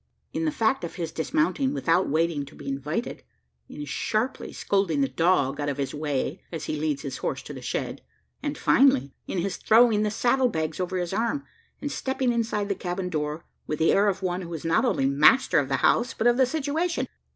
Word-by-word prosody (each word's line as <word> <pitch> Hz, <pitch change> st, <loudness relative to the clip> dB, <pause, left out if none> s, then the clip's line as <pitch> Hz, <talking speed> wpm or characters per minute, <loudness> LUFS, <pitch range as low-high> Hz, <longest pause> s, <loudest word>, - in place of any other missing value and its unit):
in 325 Hz, -, -1 dB
the 310 Hz, -, +1 dB
fact 250 Hz, -4 st, +1 dB
of 170 Hz, -, -5 dB
his 165 Hz, -3 st, -4 dB
dismounting 280 Hz, -, 0 dB
without 175 Hz, +2 st, +2 dB
waiting 160 Hz, 0 st, +1 dB
to 140 Hz, -, -13 dB
be -, -, -11 dB
invited 145 Hz, -, -3 dB, 0.5 s
in 150 Hz, -, -7 dB
sharply 215 Hz, -, -2 dB
scolding 190 Hz, -7 st, 0 dB
the 135 Hz, -, +3 dB
dog 145 Hz, -2 st, +1 dB
out 145 Hz, 0 st, -1 dB
of 140 Hz, -, -3 dB
his 135 Hz, -2 st, -2 dB
way 150 Hz, +2 st, -2 dB
as 160 Hz, -3 st, -5 dB
he -, -, -2 dB
leads 150 Hz, -2 st, -2 dB
his 135 Hz, -, -4 dB
horse -, -, -3 dB
to -, -, -8 dB
the -, -, -8 dB
shed; -, -, -3 dB, 0.4 s
and, 290 Hz, -1 st, -3 dB
finally, 265 Hz, -, +4 dB
in -, -, -3 dB
his 185 Hz, +2 st, -1 dB
throwing 225 Hz, -1 st, +5 dB
the 210 Hz, -, +1 dB
saddle 245 Hz, +4 st, +2 dB
bags 160 Hz, -5 st, -3 dB
over 185 Hz, 0 st, -2 dB
his 175 Hz, 0 st, -2 dB
arm, 235 Hz, +7 st, 0 dB, 0.4 s
and 290 Hz, -, -2 dB
stepping 265 Hz, -2 st, -1 dB
inside 225 Hz, -3 st, -1 dB
the 200 Hz, -, 0 dB
cabin 180 Hz, 0 st, -4 dB
door, 155 Hz, 0 st, -3 dB, 0.2 s
with 150 Hz, -, -2 dB
the 160 Hz, -, +3 dB
air 200 Hz, +1 st, +4 dB
of 195 Hz, -1 st, -1 dB
one 180 Hz, 0 st, -1 dB
who 170 Hz, -2 st, -8 dB
is 160 Hz, -, -7 dB
not 165 Hz, -, +3 dB
only 135 Hz, -, +1 dB
master 145 Hz, -, +5 dB
of -, -, -2 dB
the -, -, +1 dB
house, 240 Hz, +1 st, +2 dB
but 220 Hz, -, -2 dB
of 240 Hz, 0 st, +5 dB
the 260 Hz, 0 st, +4 dB
"situation." 315 Hz, +4 st, -1 dB
185 Hz, 215 wpm, -26 LUFS, 155-240 Hz, 0.5 s, throwing